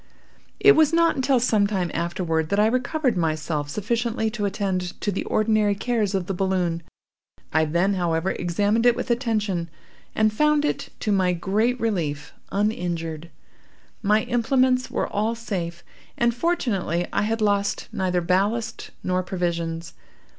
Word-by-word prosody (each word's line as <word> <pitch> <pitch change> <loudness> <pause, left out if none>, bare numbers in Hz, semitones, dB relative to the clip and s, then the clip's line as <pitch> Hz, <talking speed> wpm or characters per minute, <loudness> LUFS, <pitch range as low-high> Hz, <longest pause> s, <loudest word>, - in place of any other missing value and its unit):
"It 420 - +8
was 315 -5 +5
not 335 0 +3
until 265 -1 +2
some 215 -4 +3
time 185 -4 -1
afterward 170 -2 -1
that 200 - +1
I 210 - +5
recovered 255 +2 +1
myself 155 -3 -1
sufficiently 220 +4 -1
to 215 -2 -2
attend 190 -2 -2
to 205 - -1
the 195 - -2
ordinary 215 -1 +2
cares 210 -2 0
of 190 -2 -1
the 195 - -3
balloon. 180 -3 0 0.7
I 160 +1 +3
then, 170 +6 +1
however, 175 -1 0
examined 205 +7 +1
it 240 - +5
with 250 0 -3
attention, 210 -8 -1 0.5
and 215 0 +3
found 300 +4 +3
it, - - -2
to 215 - 0
my 185 -2 +2
great 215 +8 0
relief, 165 -10 -2 0.2
uninjured. 170 -6 -2 0.7
My 210 +1 +3
implements 255 +1 +2
were - - -1
all 215 +3 -1
safe, 175 -7 -4 0.3
and, 235 0 +2
fortunately, 225 - 0
I - - +2
had 225 +2 0
lost 200 -1 0
neither 180 -1 0
ballast 205 +6 0
nor 185 0 0
provisions. 170 -2 -3
200 Hz, 145 wpm, -24 LUFS, 175-230 Hz, 0.7 s, It